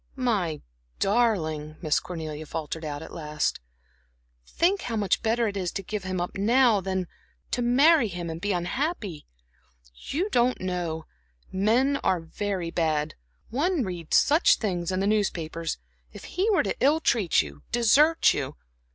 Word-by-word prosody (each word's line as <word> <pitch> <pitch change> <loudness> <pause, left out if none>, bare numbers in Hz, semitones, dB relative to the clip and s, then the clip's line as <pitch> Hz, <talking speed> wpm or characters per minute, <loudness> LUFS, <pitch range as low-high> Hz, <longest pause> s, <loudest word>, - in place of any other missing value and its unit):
"My 205 - -1 0.3
darling," 165 -9 +1
Miss 155 -2 +2
Cornelia 155 -3 -6
faltered 160 +1 -5
at 150 +1 -6
last, 150 -2 -2 0.9
"think 375 +4 +1
how 230 - -3
much 205 -4 +1
better 230 +1 +1
it 205 - -4
is 185 -3 -2
to 195 - -4
give 205 0 -5
him 185 -1 -2
up 175 - -3
now 230 0 +4
than 190 0 -1
to 175 - -16 0.4
to 245 - 0
marry 270 +3 +5
him 175 -3 -5
and 165 0 -5
be 205 +1 0
unhappy. 190 - -2 0.7
You 310 - -3
don't 245 +1 +2
know 175 -3 -3 0.5
men 235 +9 +2
are 185 - +1
very 180 +1 -3
bad; 155 -3 0 0.4
one 305 +4 +1
reads 175 -5 0
such 305 +5 +5
things 180 -5 -2
in 185 0 -1
the - - +1
newspapers. 165 -6 -1 0.3
If - - -11
he 390 +5 -1
were 400 - +3
to - - -2
ill 295 +4 +4
treat 220 - +2
you, 70 -1 -11
desert 285 +8 +4
you." 135 -2 -4
190 Hz, 155 wpm, -26 LUFS, 165-240 Hz, 0.9 s, marry